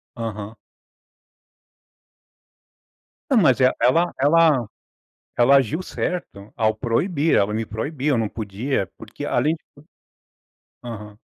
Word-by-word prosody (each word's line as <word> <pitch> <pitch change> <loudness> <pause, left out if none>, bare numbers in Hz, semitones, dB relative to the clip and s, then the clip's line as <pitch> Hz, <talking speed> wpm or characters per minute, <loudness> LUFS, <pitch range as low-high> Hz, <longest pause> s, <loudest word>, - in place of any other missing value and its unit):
Aham. 110 -2 -6 2.7
Não, 265 - +3
mas 135 - +4
e - - +3 0.2
ela 165 +8 +3
ela 150 -3 +4 0.7
ela 130 +3 +6
agiu 140 - +1
certo 170 - -5
ao 110 -2 +2
proibir. 150 +6 0
Ela 105 +2 +1
me 110 +1 -1
proibiu. 140 +6 -2
Eu - - +1
não 110 -2 0
podia, 110 +1 -3
porque - - -9
além 155 +2 +1
de 160 - -14 1.2
Aham. 105 -3 -9
125 Hz, 110 wpm, -22 LUFS, 110-155 Hz, 2.7 s, ela